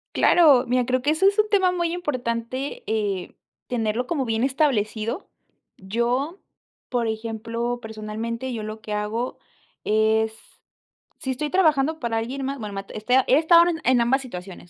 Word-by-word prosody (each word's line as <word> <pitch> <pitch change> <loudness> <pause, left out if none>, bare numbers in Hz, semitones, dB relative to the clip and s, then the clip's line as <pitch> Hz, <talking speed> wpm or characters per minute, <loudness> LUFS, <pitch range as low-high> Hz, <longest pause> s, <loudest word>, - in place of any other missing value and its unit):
Claro, 290 -8 +6
mira, 250 0 +2
creo 255 +1 0
que 290 +4 +2
eso 355 +5 +3
es 400 +1 +2
un 425 0 +3
tema 380 -3 +3
muy 345 -2 -1
importante, 260 - -3
eh, 205 -4 -2 0.3
tenerlo 230 0 -1
como 285 -5 -1
bien 225 +1 0
establecido. 255 - 0 0.5
Yo, 240 - -1 0.5
por 240 -3 0
ejemplo, 230 +2 -3
personalmente, 225 +3 -5
yo 220 - -4
lo 215 +1 -7
que 215 - -5
hago 210 +4 -2 0.5
es, 220 +1 +2 0.8
si 265 - -3
estoy 295 +4 -3
trabajando 315 -3 +2
para 230 -2 -1
alguien 260 +4 -3
más, 275 +1 -3
bueno, 210 -2 -6
ma 195 0 -5
este, 215 +4 0
a 265 - +3
he 260 - +5
estado 335 +2 +6
en 330 -2 -1
en 250 -1 +4
ambas 265 +4 +2
situaciones, 180 -7 -9
245 Hz, 165 wpm, -24 LUFS, 220-285 Hz, 0.8 s, Claro